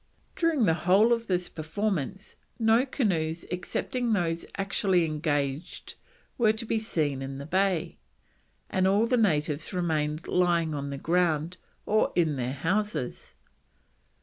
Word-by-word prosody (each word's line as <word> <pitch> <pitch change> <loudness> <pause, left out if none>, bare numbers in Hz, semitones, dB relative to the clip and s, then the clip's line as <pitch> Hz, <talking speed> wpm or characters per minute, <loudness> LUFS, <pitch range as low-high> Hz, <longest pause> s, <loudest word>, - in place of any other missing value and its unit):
During 330 -7 +2
the 165 - +4
whole 185 +8 +4
of 230 0 -2
this 180 -1 0
performance 190 +2 -3 0.2
no 230 +3 +3
canoes 170 - -1
excepting 235 +6 -1
those 170 -4 -1
actually 195 -3 +1
engaged 150 0 -2 0.5
were 220 -2 +4
to 225 +1 -5
be 225 0 0
seen 150 -11 -1
in 135 0 -5
the 140 - -7
bay, 180 0 0 0.7
and 185 0 +1
all 200 +4 +3
the 250 - +2
natives 155 -8 0
remained 155 -3 -1
lying 170 -3 +2
on 140 -1 -3
the 140 - -4
ground 165 +1 0 0.3
or 215 +1 +2
in 160 -4 +2
their 125 0 -2
houses. 185 0 -2
175 Hz, 135 wpm, -28 LUFS, 155-210 Hz, 0.7 s, the